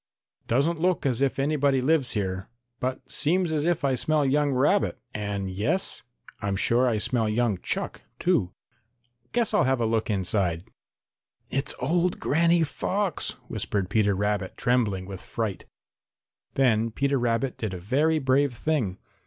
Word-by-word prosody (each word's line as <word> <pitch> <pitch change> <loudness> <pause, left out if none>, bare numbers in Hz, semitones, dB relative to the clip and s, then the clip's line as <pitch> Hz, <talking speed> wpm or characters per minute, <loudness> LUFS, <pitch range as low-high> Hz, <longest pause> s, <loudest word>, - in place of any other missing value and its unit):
"Doesn't 155 +7 +1
look 180 -3 +1
as 130 -2 0
if 140 -1 +1
anybody 140 -1 +2
lives 140 -1 +2
here, 95 -2 -3 0.3
but 130 +1 -3
seems 170 +3 +1
as 150 -1 0
if 170 -4 +1
I 135 - +2
smell 150 +3 +1
young 145 +2 +2
rabbit 140 +10 +2 0.2
and 100 -2 -3
yes, 105 - -1 0.4
I'm 100 -1 -1
sure 120 +6 +3
I 115 -3 +1
smell 115 +1 0
young 110 -3 +1
chuck, - - -3 0.2
too. 90 - +1 0.8
Guess 240 -3 0
I'll - - +4
have 130 -1 +2
a 115 - +1
look 110 0 0
inside." 95 -4 0 0.9
"It's 135 +2 -1
old 170 +6 0
Granny 170 +2 +3
Fox," 190 +5 -1
whispered 100 -2 -2
Peter 105 -2 +3
Rabbit, 100 -1 -1
trembling 110 -7 +1
with 95 -1 -8
fright. 110 -5 -4 0.9
Then 115 -4 +3
Peter 140 +4 0
Rabbit 120 +2 0
did 110 -4 -2
a - - -6
very 145 - +2
brave 135 -2 +2
thing. 125 -11 -1
125 Hz, 150 wpm, -26 LUFS, 105-150 Hz, 0.9 s, I'll